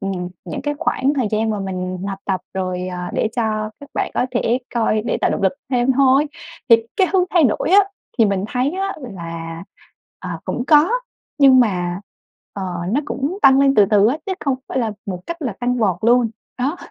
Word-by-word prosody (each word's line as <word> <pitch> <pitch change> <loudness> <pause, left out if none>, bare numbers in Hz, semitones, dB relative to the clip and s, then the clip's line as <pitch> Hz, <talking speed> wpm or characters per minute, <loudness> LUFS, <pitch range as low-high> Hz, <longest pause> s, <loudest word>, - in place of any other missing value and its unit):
ừm, 190 -3 -3 0.2
những 170 -4 -5
cái 290 +1 -1
khoảng 270 +2 +1
thời 255 -7 0
gian 220 +1 0
mà 210 -2 -2
mình 185 -1 -4
học 195 -1 -4
tập 190 -2 -1
rồi, 185 -1 -2
ờ, 180 -1 -5
để 220 - 0
cho 215 -2 -1
các 285 - -11
bạn - - -1
có - - +1
thể 245 -1 +1 0.2
coi 220 -2 +1
để 235 - -1
tạo - - +2
động - - -2
lực 190 - +3 0.2
thêm 250 0 +2
thôi. 270 +2 +4 0.4
Thì 230 - +9 0.2
cái 380 -3 +4
hướng 375 -2 +4
thay 340 -4 +4
đổi 235 - +1
á, 395 +2 +8 0.4
thì 225 - +6
mình 200 -2 0
thấy 250 +4 0
á 390 +1 -2
là, 165 - -7 0.6
ờ, - - -7
cũng 245 - -3
có 305 +4 +5 0.5
nhưng 270 -3 +7
mà, 180 -5 0 0.5
ờ, 200 - -5 0.3
nó 270 - +2
cũng 290 +6 -3
tăng 270 0 +7
lên 275 0 +4
từ 205 -5 +6
từ 205 -1 +5
á, 270 - 0
chứ 385 - -1
không 275 -3 0
phải - - -2
là 225 -4 0
một 185 -3 -4
cách 340 -1 -5
là 250 -7 -2
tăng 250 0 0
vọt 195 -6 +2
luôn, 235 0 +4 0.3
đó. 275 +7 -1
230 Hz, 215 wpm, -20 LUFS, 195-275 Hz, 0.6 s, Thì